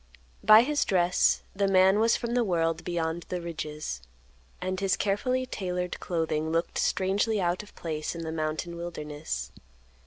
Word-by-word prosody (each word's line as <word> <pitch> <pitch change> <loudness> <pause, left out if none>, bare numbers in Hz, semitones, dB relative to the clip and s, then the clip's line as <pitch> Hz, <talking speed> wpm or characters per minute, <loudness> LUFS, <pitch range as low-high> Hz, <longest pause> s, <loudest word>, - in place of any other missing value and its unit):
By 215 +2 +9
his 295 +2 +1
dress, 180 -1 +2
the 200 0 +2
man 190 +1 +5
was 230 +1 +4
from 235 -1 -3
the 245 -1 +3
world 165 -5 0
beyond 170 -1 -2
the 180 - -2
ridges, 155 - -5 0.6
and 185 +1 -2
his 195 -1 +1
carefully 255 +6 0
tailored 180 -6 -3
clothing 160 -2 -1
looked 165 +1 -1
strangely 200 +3 +1
out 175 -1 0
of 210 - -16
place 155 -1 -4
in 165 - -5
the 160 - -4
mountain 160 +2 -3
wilderness. 150 - -5
175 Hz, 155 wpm, -28 LUFS, 160-195 Hz, 0.6 s, By